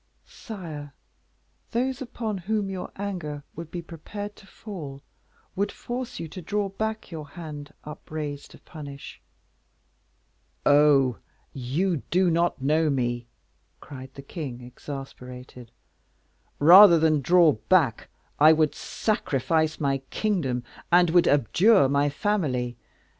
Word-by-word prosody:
"Sire, 155 - -9 0.7
those 260 +2 -1
upon 225 -5 -4
whom 200 +1 -1
your 185 -1 -6
anger 175 -8 -5
would 165 0 -7
be 175 0 -6
prepared 205 +6 -8
to 195 - -16
fall, 150 -11 -9 0.5
would 200 +1 0
force 245 0 -6
you 165 - -5
to 185 - -8
draw 205 +4 -1
back 220 +1 -4
your 155 -3 -7
hand 150 -2 -9
upraised 150 -1 -6
to - - -14
punish." 145 -3 -10 1.4
"Oh! 145 -5 +5 0.4
you 155 +8 -1
do 180 0 +3
not 170 0 +1
know 155 +4 +2
me," 120 -3 -1 0.5
cried 130 -2 -10
the 140 - -9
king, 140 -5 -6
exasperated. 125 -1 -9 0.9
"Rather 175 +4 +9
than 155 -2 +3
draw 170 +3 +5
back, 135 0 +1 0.3
I 155 +2 +8
would 155 -1 +2
sacrifice 160 - -1
my 140 -2 0
kingdom, 155 - -1 0.3
and 175 -1 +5
would 175 0 +5
abjure 145 - +4
my 140 +1 +2
family. 140 - -1
155 Hz, 120 wpm, -26 LUFS, 140-190 Hz, 1.4 s, Rather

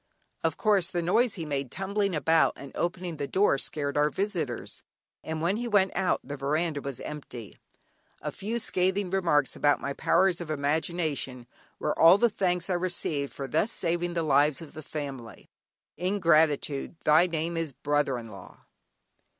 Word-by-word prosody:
Of - - 0
course, 205 -6 +3
the 175 -1 -2
noise 225 +6 +2
he 165 -4 -5
made 140 -3 -2
tumbling 195 - -1
about 160 +2 +3
and 140 -1 -10
opening 175 -1 -3
the 140 -1 -3
door 190 -7 +2
scared 140 -1 -2
our 150 0 +3
visitors, 170 - -3 0.4
and 160 0 -4
when 185 +5 +1
he 240 +1 -3
went 200 -4 +2
out, 185 0 +1
the 145 +2 -6
veranda 150 +2 -1
was 140 -3 -6
empty. 125 -7 -8 0.6
A - - -4
few 215 +4 -3
scathing 190 -3 0
remarks 165 -7 +2
about 145 -1 +2
my 140 - -3
powers 180 +4 +2
of 170 - -7
imagination 150 -3 -1 0.3
were 150 - -1
all 170 +4 +8
the 235 +2 +3
thanks 180 -3 0
I 190 - 0
received 175 -5 -1
for 135 - -6
thus 210 - +1
saving 175 -1 -1
the 165 - 0
lives 145 -1 +3
of 160 -3 -11
the 155 - -8
family. 140 -6 -7 0.5
Ingratitude, 160 -6 +2
thy 155 +4 +5
name 165 0 -2
is 165 -3 -2
brother 145 -1 0
in 115 -2 -8
law! 100 - -13
160 Hz, 165 wpm, -28 LUFS, 145-185 Hz, 0.6 s, all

